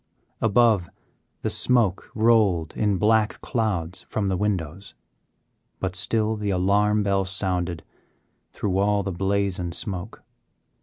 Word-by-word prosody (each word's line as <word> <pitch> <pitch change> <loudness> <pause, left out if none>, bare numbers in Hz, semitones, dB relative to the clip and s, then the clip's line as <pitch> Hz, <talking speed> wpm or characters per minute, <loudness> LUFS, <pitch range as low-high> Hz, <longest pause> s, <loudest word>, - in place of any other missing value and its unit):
Above, 110 -4 +3 0.5
the - - 0
smoke 115 -7 +1
rolled 110 -8 +2
in 105 -3 +1
black 110 +2 +2
clouds 95 -7 -2
from 100 -3 -1
the 95 - 0
windows, 90 -3 -3 0.8
but 95 -1 -3
still 110 +2 +1
the 105 -1 -3
alarm 100 +3 +2
bell 100 -1 +1
sounded 90 -3 -2 0.7
through 95 -2 -2
all 100 0 +2
the 95 - -3
blaze 95 +1 0
and 85 -1 -4
smoke. 95 -5 -5
100 Hz, 120 wpm, -24 LUFS, 90-105 Hz, 0.8 s, Above